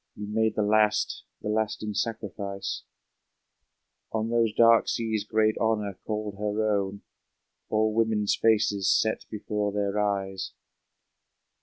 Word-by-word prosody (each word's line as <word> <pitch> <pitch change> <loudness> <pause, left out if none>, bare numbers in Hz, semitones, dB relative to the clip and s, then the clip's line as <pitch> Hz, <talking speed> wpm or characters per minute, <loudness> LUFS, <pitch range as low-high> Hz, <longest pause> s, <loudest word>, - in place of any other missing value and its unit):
You 105 - -6
made 110 +1 +1
the 105 - +1
last, 105 0 +2 0.2
the - - -3
lasting 105 0 -1
sacrifice! 100 -3 -3 1.3
On 110 +1 -1
those 115 -2 +3
dark 115 +1 +5
seas 110 -2 -1
great 110 0 +2
Honor 105 -4 0
called 105 -2 -3
her 105 +1 0
own, 100 0 -3 0.7
All 110 0 +2
women's 110 -2 +2
faces 105 -3 +2
set 110 0 +2
before 105 -1 -2
their 100 0 -1
eyes! 95 -2 -2
105 Hz, 120 wpm, -27 LUFS, 100-110 Hz, 1.3 s, dark